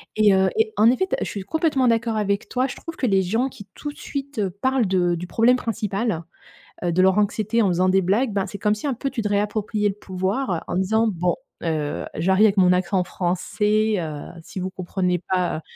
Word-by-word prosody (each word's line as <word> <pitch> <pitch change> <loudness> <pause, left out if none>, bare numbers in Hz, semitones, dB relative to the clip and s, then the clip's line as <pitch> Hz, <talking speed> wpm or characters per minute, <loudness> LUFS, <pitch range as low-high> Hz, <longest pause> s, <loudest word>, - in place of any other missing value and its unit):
Et 215 -2 +5
heu 190 0 +3
et 440 0 +2
en 225 - +6
effet, 255 +10 +2
te 380 - -1
je - - -4
suis 200 - -5
complètement 295 - +1
d'accord 230 -1 +1
avec 200 -1 -1
toi. 255 +1 +1
Je 270 - -4
trouve 330 - -8
que 265 - -2
les 195 -5 +3
gens 225 +8 0
qui, 205 -6 -11
tout 295 - -5
de - - -18
suite, 280 -3 -5
heu, 200 -2 +1
parlent 245 +5 0
de 180 -2 +2
du 175 +1 -4
problème 230 +6 +4
principal, 210 -5 -2 0.6
heu, 175 - +1
de 180 +2 +2
leur 190 +1 +4
anxiété 215 +2 +1
en 210 - +3
faisant 180 +1 +2
des 190 +1 +4
blagues, 210 +6 +1
beh, 195 -1 +1
c'est 200 - -7
comme 210 +1 +1
si, 210 - -5
un 270 - -1
peu 270 +3 -3
tu 245 -3 -2
te 210 - -2
réappropriais 210 +1 0
le 195 - -4
pouvoir 190 0 -2
en - - -3
disant: 220 +4 +2
«Bon, 175 -1 0 0.3
heu, 155 -3 -2
j'arrive 190 +6 +3
avec 205 -1 +2
mon 180 -1 +5
accent 185 +1 +1
français. 210 +5 0
Heu, 155 -3 -5
si 190 - -7
vous 185 +1 -2
comprenez 180 -1 -1
pas, 180 -3 0
205 Hz, 230 wpm, -23 LUFS, 185-230 Hz, 0.6 s, en